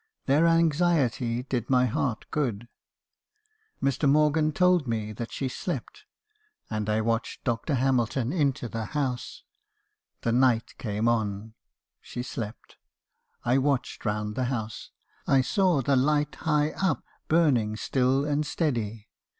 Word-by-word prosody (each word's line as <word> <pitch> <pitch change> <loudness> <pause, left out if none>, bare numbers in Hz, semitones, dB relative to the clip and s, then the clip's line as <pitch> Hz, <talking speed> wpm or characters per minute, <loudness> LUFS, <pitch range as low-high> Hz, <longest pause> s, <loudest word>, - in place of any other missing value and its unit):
Their 150 +5 +4
anxiety 155 -8 +2
did 125 -3 -3
my 125 -1 +4
heart 120 -1 -1
good. 120 -7 -1 1.2
Mr. 140 +1 +2
Morgan 150 +1 +3
told 180 -2 +3
me 110 -2 -2
that 115 +2 -6
she 135 - -2
slept, 130 - -5 0.7
and 110 -1 -2
I 105 +1 +2
watched 115 +1 -2
Dr. 120 +5 -1
Hamilton 130 0 +1
into 140 -7 0
the 115 0 -4
house. 130 -4 -3 0.8
The 115 - 0
night 120 -2 +2
came 110 -2 -1
on. 110 -2 -1 0.5
She 120 - -6
slept. 115 -3 -7 0.7
I 125 +3 +3
watched 135 -2 -1
round 105 -1 -2
the 130 +3 -1
house. 110 -4 -4 0.4
I 135 -1 +5
saw 180 -1 +2
the 140 +2 +2
light 150 +3 +2
high 150 -1 +1
up, 190 - -1 0.2
burning 135 -10 +3
still 130 +4 +1
and 150 0 +1
steady. 115 - -2
130 Hz, 130 wpm, -27 LUFS, 115-145 Hz, 1.2 s, I